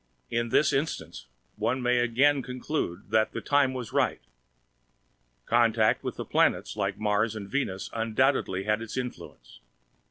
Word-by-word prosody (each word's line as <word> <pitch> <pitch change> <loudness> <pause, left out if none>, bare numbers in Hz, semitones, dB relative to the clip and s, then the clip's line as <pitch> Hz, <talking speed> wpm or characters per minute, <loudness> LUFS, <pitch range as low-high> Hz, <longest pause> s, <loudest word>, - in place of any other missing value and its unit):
In 115 0 0
this 145 +5 +3
instance, 85 - -3 0.3
one 115 +5 0
may 125 0 +2
again 135 +4 +3
conclude 125 - -4
that 110 0 +2
"the - - -3
time 140 -2 +2
was 125 -4 -6
right." - - +1 1.3
Contact 115 -2 +3
with - - -4
planets - - +2
like - - -2
Mars 105 +1 0
and 100 -2 -6
Venus 100 -6 -2
undoubtedly 115 -3 +1
had 105 +2 0
its 115 +2 -6
influence. 125 -1 -7
115 Hz, 135 wpm, -27 LUFS, 105-130 Hz, 1.3 s, this